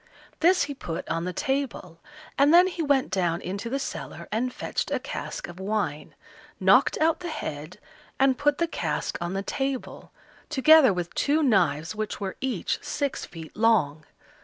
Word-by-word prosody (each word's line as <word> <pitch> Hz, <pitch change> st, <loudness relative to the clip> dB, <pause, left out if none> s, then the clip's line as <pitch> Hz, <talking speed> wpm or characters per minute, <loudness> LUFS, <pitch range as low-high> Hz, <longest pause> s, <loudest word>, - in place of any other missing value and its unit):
This 360 Hz, +3 st, +4 dB
he 285 Hz, 0 st, -4 dB
put 175 Hz, -10 st, -6 dB
on 165 Hz, +1 st, -1 dB
the 180 Hz, -, -2 dB
table, 265 Hz, -, -3 dB, 0.4 s
and 280 Hz, +2 st, +4 dB
then 350 Hz, +2 st, +8 dB
he 360 Hz, -2 st, -3 dB
went 285 Hz, -4 st, +1 dB
down 175 Hz, -3 st, 0 dB
into 200 Hz, +5 st, -5 dB
the 270 Hz, -, -1 dB
cellar 275 Hz, -, -6 dB
and 245 Hz, +4 st, 0 dB
fetched -, -, -3 dB
a -, -, 0 dB
cask -, -, -6 dB
of 175 Hz, +1 st, -11 dB
wine, 190 Hz, -7 st, -3 dB, 0.4 s
knocked -, -, +4 dB
out 320 Hz, +1 st, +2 dB
the 350 Hz, -1 st, -5 dB
head, 155 Hz, -, -6 dB, 0.4 s
and 265 Hz, -1 st, +4 dB
put 290 Hz, +2 st, +1 dB
the 340 Hz, -, +2 dB
cask -, -, -3 dB
on 175 Hz, +1 st, -3 dB
the 195 Hz, 0 st, -2 dB
table, 270 Hz, +3 st, -4 dB, 0.4 s
together 300 Hz, -2 st, +6 dB
with 175 Hz, -2 st, -4 dB
two 305 Hz, +2 st, +1 dB
knives, 175 Hz, -, +2 dB
which 215 Hz, 0 st, -4 dB
were 195 Hz, -2 st, -4 dB
each 265 Hz, -1 st, -1 dB
six 285 Hz, -2 st, -3 dB
feet 160 Hz, -2 st, -11 dB
long. 185 Hz, -10 st, +2 dB
230 Hz, 170 wpm, -26 LUFS, 175-285 Hz, 0.4 s, then